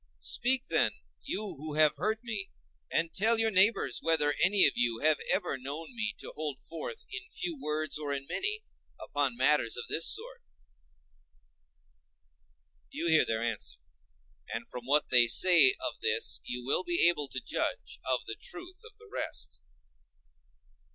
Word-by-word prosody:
Speak 255 +1 +1
then, - - +2 0.3
you 205 - -4 0.2
who 150 0 -4
have 155 -1 +4
heard 220 +2 -2
me, 215 -5 -5 0.4
and 165 0 0
tell 225 +4 +3
your 225 0 +2
neighbors 190 - +3
whether 155 -3 +3
any 195 +1 +6
of - - +6
you 120 -1 +2
have 155 0 +3
ever 180 -8 0
known 150 - -5
me 220 -2 -2 0.2
hold 150 -3 -4
forth 305 - -7
in - - -7
few 350 -2 -3
words 155 0 -1
or 145 -2 -3
in 140 -1 -2
many 420 +2 -2 0.4
upon 140 -4 -1
matters 130 -3 +2
of 120 - -4
this 165 - +2
sort.… 485 +3 0 2.5
You 170 - -3
hear 160 -1 +5
their 110 0 -1
answer. 115 -3 -2 0.7
And - - -5
from 125 0 -9
what 145 +2 +2
they 120 -2 +6
say 185 - +5
of - - -5
this 455 0 +2
you 120 0 -5
will 140 +7 +1
be 175 -1 +4
able 150 -5 +1
to 130 -1 -4
judge - - -3
of - - -1
the - - -4
truth 365 +1 -9
of 455 -2 -14
the 450 0 -17
rest. - - -4
165 Hz, 160 wpm, -30 LUFS, 140-230 Hz, 2.5 s, any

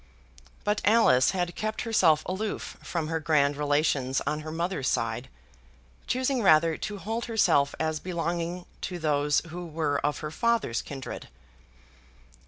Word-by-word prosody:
But 210 0 0
Alice 205 - +5
had 175 -2 -1
kept 215 +3 -3
herself 170 -10 +3
aloof 205 +4 -4
from 170 -3 -3
her 165 0 0
grand 150 -2 +2
relations 145 -2 +1
on 150 - -1
her 155 +1 -6
mother's 170 -4 -2
side, 115 +3 -1 0.8
choosing 260 0 0
rather 165 -4 +5
to 210 +4 -5
hold 225 +4 -3
herself 170 -11 +2
as 160 -1 -1
belonging 175 0 -3 0.2
to 180 - -4
those 150 -2 +2
who 175 +2 -6
were 155 -3 -1
her 150 +1 -2
father's 230 - +1
kindred. 135 -2 -7
160 Hz, 135 wpm, -27 LUFS, 145-190 Hz, 0.8 s, Alice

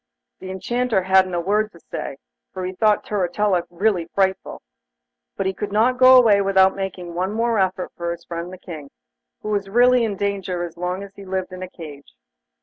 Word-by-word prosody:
The 185 - -8
Enchanter 215 +2 -1
hadn't 190 -1 +3
a - - 0
word 210 +4 0
to 170 - -16
say, 140 - -6 0.3
for 185 -1 -5
he 185 - -4
thought 210 +2 +2
Turritella 190 -2 0
really 175 -1 0
frightful, 190 -1 -1 0.7
but 195 - -1
he 190 - 0
could 205 +2 -5
not 240 +5 +2
go 255 0 +9
away 215 -5 +5
without 190 -1 +4
making 185 -3 -5
one 185 +3 -1
more 230 0 0
effort 185 -1 -1
for 170 0 -4
his 170 0 -6
friend 170 +1 -6
the 185 - -9
King, 155 -6 -9 0.5
who 215 - -4
was 200 -2 -1
really 245 +3 +4
in 220 -2 -1
great 200 +1 0
danger 190 -3 -3
as 170 -1 -7
long 180 +2 -3
as 200 0 -11
he 200 - -12
lived 190 -1 -4
in 185 - -8
a 185 - -6
cage. 145 - -12
190 Hz, 205 wpm, -22 LUFS, 180-210 Hz, 0.7 s, go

